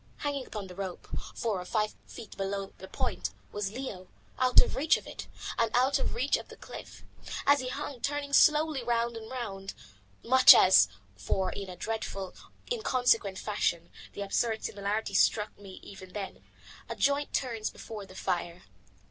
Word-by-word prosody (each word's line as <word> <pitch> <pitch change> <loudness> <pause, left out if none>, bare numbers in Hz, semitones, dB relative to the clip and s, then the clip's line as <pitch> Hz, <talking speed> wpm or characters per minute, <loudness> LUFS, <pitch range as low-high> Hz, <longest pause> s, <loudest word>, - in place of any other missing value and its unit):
Hanging 285 -3 -3
to 210 - -4
the 185 -1 -10
rope, 190 -1 -6 0.3
four 210 -5 -1
or - - -8
five 215 +2 0
feet 215 - -10
below 195 0 -2
the 190 - -9
broken - - -25
point, - - -2 0.2
was 205 -1 -3
Leo, 210 -7 -6 0.3
out 255 -1 +6
of - - +4
reach 305 +4 +3
of - - -11
it, - - -8 0.3
and 230 - +3
out 260 +3 +3
of - - -2
reach 255 +4 +2
of - - -9
the - - -12
cliff; - - -10 0.4
as 285 0 +6
he 255 - -4
hung 275 -2 -5
turning 285 0 -2
slowly 305 -1 +5
round 235 0 0
and 220 -1 -8
round, 200 -7 -5 0.5
much 260 +2 +9
as 145 - +7 0.3
for 140 - -1
in 200 -1 -6
a 180 - -7
dreadful, 195 -3 -4 0.4
inconsequent 245 - +2
fashion 175 -5 -1 0.2
the 200 - -4
absurd 220 +3 0
similarity 205 +2 -2
struck 210 0 +3
me 195 -2 -11
even 190 -2 -11
then 200 -2 -6 0.5
a - - -3
joint 285 +1 +1
turns 230 -5 -1
before 215 -2 -8
the 185 - -14
fire. 175 -1 -2
220 Hz, 175 wpm, -30 LUFS, 195-255 Hz, 0.5 s, much